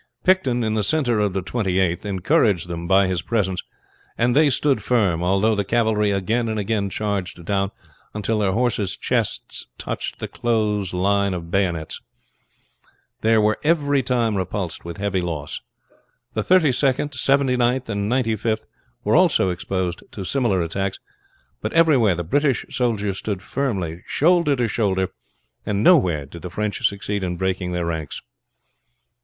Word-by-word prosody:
Picton 135 Hz, -11 st, +2 dB
in 110 Hz, -1 st, 0 dB
the 110 Hz, -, +1 dB
center 120 Hz, -1 st, +1 dB
of 105 Hz, -2 st, +1 dB
the 95 Hz, -1 st, -2 dB
Twenty 95 Hz, -3 st, -1 dB
eighth 90 Hz, +1 st, 0 dB
encouraged 100 Hz, -, +2 dB
them 85 Hz, 0 st, -5 dB
by 95 Hz, +1 st, +5 dB
his 95 Hz, -2 st, -1 dB
presence, 95 Hz, -6 st, -1 dB, 0.6 s
and 120 Hz, +1 st, +2 dB
they 150 Hz, 0 st, +5 dB
stood 140 Hz, +1 st, +1 dB
firm, 100 Hz, -9 st, +1 dB
although 95 Hz, +5 st, +2 dB
the 100 Hz, -1 st, 0 dB
cavalry 110 Hz, 0 st, +1 dB
again 110 Hz, +4 st, 0 dB
and 110 Hz, -1 st, -1 dB
again 100 Hz, -1 st, -1 dB
charged 95 Hz, -4 st, -3 dB
down 100 Hz, +1 st, 0 dB, 0.5 s
until 105 Hz, +1 st, -1 dB
their 100 Hz, -2 st, +1 dB
horse's 110 Hz, -4 st, 0 dB
chests -, -, -2 dB
touched -, -, -4 dB
the -, -, -5 dB
close 105 Hz, -5 st, 0 dB
line 100 Hz, +1 st, +1 dB
of 85 Hz, -1 st, -7 dB
bayonets. 85 Hz, -5 st, -1 dB, 1.2 s
They 110 Hz, 0 st, +4 dB
were 105 Hz, 0 st, +2 dB
every 145 Hz, -3 st, +2 dB
time 120 Hz, -4 st, 0 dB
repulsed 95 Hz, -1 st, -3 dB
with 85 Hz, 0 st, -7 dB
heavy 100 Hz, -2 st, -1 dB
loss. 80 Hz, -4 st, -4 dB, 0.7 s
The -, -, 0 dB
Thirty 180 Hz, -6 st, +4 dB
second, 140 Hz, +3 st, 0 dB
Seventy 135 Hz, 0 st, +2 dB
ninth, 125 Hz, +1 st, +1 dB
and 100 Hz, -1 st, -2 dB
Ninety 120 Hz, -3 st, +1 dB
fifth 110 Hz, +1 st, -2 dB, 0.4 s
were -, -, +2 dB
also 95 Hz, -, +4 dB
exposed 90 Hz, 0 st, -3 dB
to 100 Hz, -, -5 dB
similar 100 Hz, -5 st, +1 dB
attacks; 95 Hz, +4 st, -2 dB, 0.6 s
but 110 Hz, -, -3 dB
everywhere 140 Hz, -, +4 dB
the 85 Hz, -, -3 dB
British 140 Hz, -, +1 dB
soldiers 105 Hz, -6 st, -1 dB
stood 100 Hz, -3 st, -4 dB
firmly 95 Hz, -12 st, -2 dB
shoulder 170 Hz, -2 st, +3 dB
to 120 Hz, -2 st, 0 dB
shoulder, 95 Hz, -4 st, 0 dB, 0.5 s
and 105 Hz, 0 st, -1 dB
nowhere 90 Hz, -, +4 dB
did 85 Hz, +4 st, -11 dB
the 90 Hz, -, -6 dB
French 105 Hz, +3 st, -3 dB
succeed 100 Hz, 0 st, -3 dB
in 90 Hz, -1 st, -2 dB
breaking 95 Hz, -1 st, -1 dB
their 90 Hz, -1 st, -1 dB
ranks. 80 Hz, -3 st, -4 dB
105 Hz, 160 wpm, -22 LUFS, 95-120 Hz, 1.2 s, by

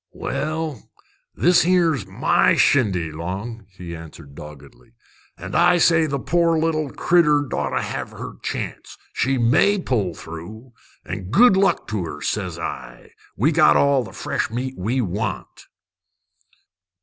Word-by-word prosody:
"This 175 Hz, +1 st, +4 dB
'ere's 165 Hz, -, +2 dB
my 95 Hz, -, +2 dB
shindy, 95 Hz, -, +2 dB
Long," 95 Hz, +7 st, -6 dB
he 90 Hz, -3 st, -9 dB
answered 80 Hz, -3 st, -12 dB
doggedly. 70 Hz, -4 st, -13 dB, 0.4 s
"An' 95 Hz, +3 st, -8 dB
I 175 Hz, +1 st, +4 dB
say 165 Hz, -1 st, +4 dB
the 140 Hz, -1 st, -2 dB
poor 170 Hz, +3 st, +1 dB
little 155 Hz, -2 st, 0 dB
critter 150 Hz, -4 st, +3 dB
'd 135 Hz, -, -8 dB
oughter -, -, -1 dB
have -, -, -5 dB
her -, -, -9 dB
chance. -, -, -6 dB, 0.2 s
She 135 Hz, +1 st, 0 dB
may 130 Hz, -, +3 dB
pull 105 Hz, -, -1 dB
through. 105 Hz, +12 st, -10 dB, 0.3 s
An' 90 Hz, +1 st, -6 dB
good 220 Hz, -, +5 dB
luck 195 Hz, +1 st, +1 dB
to 105 Hz, -4 st, -2 dB
her, 80 Hz, -, -7 dB
ses -, -, -3 dB
I! -, -, -7 dB, 0.3 s
We -, -, +2 dB
got 75 Hz, -, +5 dB
all 140 Hz, -2 st, +3 dB
the -, -, -10 dB
fresh -, -, -3 dB
meat 125 Hz, +3 st, -4 dB
we 115 Hz, +8 st, -1 dB
want." 100 Hz, -1 st, -5 dB
120 Hz, 135 wpm, -21 LUFS, -, 0.4 s, good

